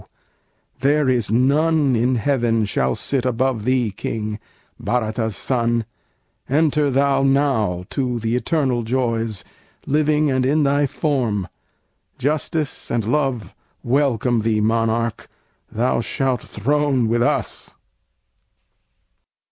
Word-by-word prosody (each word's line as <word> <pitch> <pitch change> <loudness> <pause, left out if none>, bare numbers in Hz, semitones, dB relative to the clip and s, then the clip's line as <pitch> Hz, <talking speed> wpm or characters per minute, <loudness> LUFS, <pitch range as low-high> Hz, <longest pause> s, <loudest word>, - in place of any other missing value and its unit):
there 145 +1 +2
is 125 -4 +1
none 140 +4 +2
in 125 +3 +1
heaven 115 -2 +1
Shall 65 -10 0
sit 135 -3 -1
above 125 -2 0
thee, 125 -4 +1
King! 105 +2 -4 0.4
Bhârata's 110 -2 -1
son! 120 -3 0 0.6
Enter 150 0 +2
thou 135 0 +2
now 135 -10 +1
to 125 -3 -1
the 115 +1 -1
eternal 130 -2 0
joys, 115 -3 -1 0.4
Living 150 0 +2
and 130 -1 +1
in 145 +4 +2
thy 140 +1 +2
form. 125 - -1 0.7
Justice 150 +1 -2
and 115 -3 -1
Love 130 -5 -1 0.3
Welcome 125 -3 +1
thee, 110 -1 +1
Monarch! 115 +1 0 0.4
thou 120 +1 0
shalt 130 0 -1
throne 135 +1 0
with 120 +1 +1
us." - - -1
125 Hz, 110 wpm, -21 LUFS, 115-140 Hz, 0.7 s, there